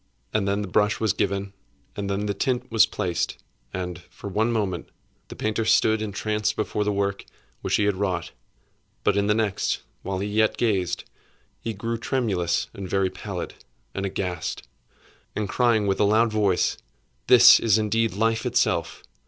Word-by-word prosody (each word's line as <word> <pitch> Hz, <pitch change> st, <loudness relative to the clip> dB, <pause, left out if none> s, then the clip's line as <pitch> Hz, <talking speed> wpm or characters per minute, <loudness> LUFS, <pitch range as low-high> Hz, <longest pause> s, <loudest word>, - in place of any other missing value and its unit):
And 105 Hz, -2 st, +1 dB
then 100 Hz, +1 st, 0 dB
the -, -, -5 dB
brush 105 Hz, +3 st, +2 dB
was 110 Hz, -4 st, +2 dB
given, 100 Hz, 0 st, -1 dB, 0.4 s
and 100 Hz, -1 st, -3 dB
then 100 Hz, +1 st, -1 dB
the 100 Hz, -, 0 dB
tint 125 Hz, +4 st, -1 dB
was 110 Hz, -1 st, +5 dB
placed; 90 Hz, -2 st, -2 dB, 0.3 s
and, 90 Hz, -2 st, -5 dB
for 100 Hz, -, -8 dB
one 110 Hz, +4 st, +1 dB
moment, 100 Hz, -6 st, -2 dB, 0.4 s
the -, -, -9 dB
painter 110 Hz, +1 st, -1 dB
stood 110 Hz, 0 st, +3 dB
entranced 105 Hz, 0 st, -1 dB
before 105 Hz, -1 st, -1 dB
the 105 Hz, -, 0 dB
work 100 Hz, 0 st, -1 dB, 0.4 s
which -, -, 0 dB
he -, -, +2 dB
had 100 Hz, -1 st, +2 dB
wrought; 90 Hz, -3 st, -2 dB, 0.7 s
but 100 Hz, -, +3 dB
in 100 Hz, 0 st, +1 dB
the 105 Hz, -, +3 dB
next, 110 Hz, -4 st, 0 dB, 0.2 s
while 95 Hz, -1 st, -3 dB
he 100 Hz, +2 st, -2 dB
yet 110 Hz, +1 st, +2 dB
gazed, 95 Hz, -6 st, 0 dB, 0.6 s
he 115 Hz, -1 st, -4 dB
grew 115 Hz, +3 st, -3 dB
tremulous 100 Hz, -10 st, 0 dB
and 95 Hz, -2 st, -7 dB
very 95 Hz, -1 st, +1 dB
pallid, -, -, -6 dB, 0.4 s
and 95 Hz, -, -3 dB
aghast, 90 Hz, -3 st, -4 dB, 0.7 s
and 105 Hz, -1 st, -1 dB
crying 115 Hz, -1 st, +2 dB
with 95 Hz, -1 st, 0 dB
a -, -, +4 dB
loud 110 Hz, +3 st, +3 dB
voice, 100 Hz, -4 st, +1 dB, 0.5 s
'This -, -, +9 dB
is 110 Hz, -3 st, +3 dB
indeed 110 Hz, -1 st, +1 dB
Life 115 Hz, +2 st, +1 dB
itself! -, -, 0 dB
105 Hz, 170 wpm, -25 LUFS, 95-110 Hz, 0.7 s, This